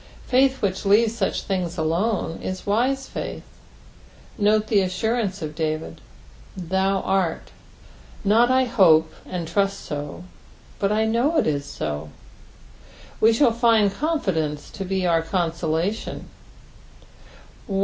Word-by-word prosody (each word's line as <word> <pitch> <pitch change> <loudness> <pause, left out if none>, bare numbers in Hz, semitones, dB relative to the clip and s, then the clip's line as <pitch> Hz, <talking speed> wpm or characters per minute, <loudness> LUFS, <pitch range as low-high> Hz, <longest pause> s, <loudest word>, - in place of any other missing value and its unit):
Faith 265 0 +2
which 190 0 -1
leaves 215 +3 +3
such 200 -5 -1
things 180 -3 -2
alone 170 +3 -1
ia 185 - -3
wise 255 +6 +1
faith. - - -6 0.9
Note 215 +1 +2
the 210 -2 +3
assurance 195 +1 -1
of 155 -1 -5
David, 155 0 -3 0.3
" - - -23
thou 190 +2 0
art," 190 -3 -1 0.7
not 225 +4 +4
I 260 0 +4
hope 165 -10 +4
and 175 -3 -4
trust 195 +3 0
so, 145 +3 -6 0.6
but 200 0 +1
I 215 +1 +2
know 240 +9 +1
it - - +3
is 145 -2 -1
so; 75 - -5 1.1
we 225 - +5
shall 235 +1 +3
find 225 -4 +3
confidence 190 - -2
to 195 - -6
be 190 0 -1
our 165 -2 +3
coasolation. 170 +3 -2
195 Hz, 125 wpm, -23 LUFS, 165-225 Hz, 1.1 s, we